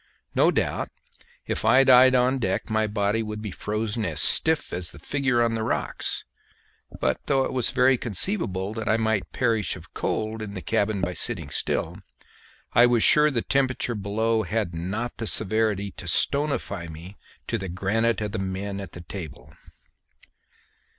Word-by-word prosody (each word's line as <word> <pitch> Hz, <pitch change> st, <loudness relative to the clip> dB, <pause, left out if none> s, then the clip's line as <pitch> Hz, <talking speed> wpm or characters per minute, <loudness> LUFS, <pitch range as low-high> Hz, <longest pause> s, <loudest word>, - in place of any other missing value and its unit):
No -, -, +4 dB
doubt -, -, -1 dB, 0.6 s
if -, -, -3 dB
I 135 Hz, +1 st, +6 dB
died 130 Hz, 0 st, +7 dB
on 130 Hz, +2 st, +2 dB
deck 95 Hz, -1 st, -2 dB
my 110 Hz, 0 st, +1 dB
body 105 Hz, +1 st, 0 dB
would 105 Hz, -1 st, -5 dB
be 105 Hz, -2 st, -6 dB
frozen 105 Hz, +3 st, -3 dB
as -, -, -2 dB
stiff 160 Hz, -1 st, +3 dB
as 90 Hz, -1 st, -3 dB
the -, -, -13 dB
figure 135 Hz, -4 st, 0 dB
on 115 Hz, -1 st, +1 dB
the 115 Hz, -, -2 dB
rocks; 110 Hz, -, -2 dB, 0.7 s
but, 65 Hz, -1 st, 0 dB
though 135 Hz, -2 st, +2 dB
it -, -, -4 dB
was 125 Hz, -2 st, +3 dB
very 130 Hz, -1 st, +3 dB
conceivable 105 Hz, -, -1 dB
that 110 Hz, -2 st, -4 dB
I 110 Hz, -, +3 dB
might 110 Hz, -3 st, -1 dB
perish 115 Hz, -, 0 dB
of -, -, -14 dB
cold 110 Hz, 0 st, -2 dB
in 105 Hz, -1 st, -6 dB
the 95 Hz, -, -5 dB
cabin 100 Hz, -1 st, 0 dB
by 90 Hz, -, -1 dB
sitting 85 Hz, -, -1 dB
still, -, -, -1 dB, 0.7 s
I 120 Hz, +1 st, +6 dB
was 120 Hz, -2 st, +3 dB
sure 150 Hz, 0 st, +7 dB
the 120 Hz, -6 st, -1 dB
temperature 130 Hz, -3 st, 0 dB
below 110 Hz, +2 st, 0 dB
had 100 Hz, -1 st, -2 dB
not 100 Hz, +9 st, -4 dB
the 115 Hz, -, -3 dB
severity 105 Hz, -2 st, +1 dB
to 90 Hz, -, -8 dB
stonify 120 Hz, -, 0 dB
me 85 Hz, +5 st, -10 dB, 0.3 s
to 115 Hz, -, -2 dB
the 95 Hz, -1 st, -5 dB
granite 110 Hz, +6 st, 0 dB
of 105 Hz, -1 st, -3 dB
the 110 Hz, -, -3 dB
men 95 Hz, +1 st, -4 dB
at 95 Hz, -, -9 dB
the 90 Hz, -, -9 dB
table. 85 Hz, -4 st, -9 dB
110 Hz, 170 wpm, -25 LUFS, 95-120 Hz, 0.7 s, died